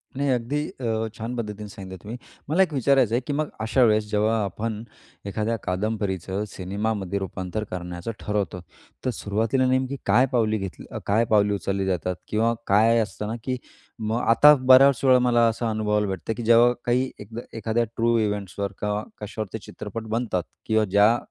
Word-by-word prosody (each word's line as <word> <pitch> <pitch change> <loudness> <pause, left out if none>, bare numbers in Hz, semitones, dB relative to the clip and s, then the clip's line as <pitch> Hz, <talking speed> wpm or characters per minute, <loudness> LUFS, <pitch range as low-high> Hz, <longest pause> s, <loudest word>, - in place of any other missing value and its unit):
नाही, 140 +1 0
अगदी 125 +4 0
अ, 110 - -2
छान 115 +2 -5
पद्धतीने 105 -3 -5
सांगितलं 95 -1 -9
तुम्ही. 115 +4 -6 0.3
मला 185 +5 +4
एक 165 - -3
विचारायचं 130 -3 +3
आहे, 125 - +1
की 145 - -1
मग 150 +1 -1
अशा 125 +3 +3
वेळेस 110 -2 +3
जेव्हा 110 +2 +2
आपण 105 +3 -4 0.4
एखाद्या 110 +3 -1
कादंबरीचं 95 0 -2
सिनेमामध्ये 100 0 -3
रूपांतर 95 +2 -4
करण्याचं 90 +3 -5
ठरवतो, 100 -3 -2 0.4
तर - - +2
सुरुवातीला 115 +6 0
नेमकी 130 +1 +1
काय 120 +7 +5
पावली 110 -3 +2
घेतली 95 -3 -6 0.2
काय 110 +3 +2
पावले 105 -1 +3
उचलली 100 -1 -2
जातात? 90 -1 -1
किंवा 115 +2 +1
काय 115 +3 +4
असत 105 -1 -3
ना, 110 - -3
की 130 -1 -2 0.4
मग 110 +2 -1
आता 145 +6 +8
बऱ्याच 130 0 +6
वेळा 130 -2 +6
मला 120 -2 +4
असा 115 +1 -1
अनुभवायला 105 -1 0
भेटतं 95 +3 -3
की 120 - -4
जेव्हा 120 +2 +6
काही 125 +2 +1
एकदा 110 +3 -7 0.2
एखाद्या 115 +2 0
ट्रू 115 0 +2
इव्हेंट्सवर 100 -2 -2
का 105 0 -1 0.2
कश्यावर 110 0 -5
ते 110 - -2
चित्रपट 110 +2 -7
बनतात. 110 -6 -1 0.2
किंवा 110 -1 +2
ज्या 105 +4 +4
110 Hz, 170 wpm, -24 LUFS, 100-120 Hz, 0.4 s, आता